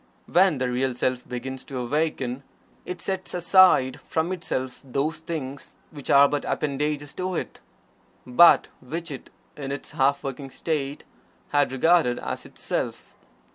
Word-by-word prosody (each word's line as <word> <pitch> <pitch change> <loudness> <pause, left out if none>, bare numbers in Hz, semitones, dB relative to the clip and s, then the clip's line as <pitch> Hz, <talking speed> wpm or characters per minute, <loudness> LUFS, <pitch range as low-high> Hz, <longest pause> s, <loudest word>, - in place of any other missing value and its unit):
When 180 -3 +4
the 125 -1 -1
Real 130 0 0
Self 125 0 -1
begins 130 +1 -5
to 135 - -6
awaken, 135 0 -1 0.5
it 180 -1 -5
sets 190 -1 -3
aside 175 -7 +5
from 160 +2 0
itself 130 -8 -3
those 140 +4 -2
things 145 -5 -6 0.2
which 145 -4 -9
are 140 0 +7
but 145 0 -2
appendages 145 0 -2
to 185 0 -3
it, - - -4 0.7
but 125 +8 +6
which 165 +5 -5
it, 135 - -8 0.3
in 140 -2 -5
its 140 - -6
half 140 -1 +2
waking 135 0 -5
state, 145 -1 -3 0.5
had 145 -2 +2
regarded 135 -2 +3
as - - -5
its - - -15
Self. - - -3
140 Hz, 145 wpm, -25 LUFS, 130-165 Hz, 0.7 s, are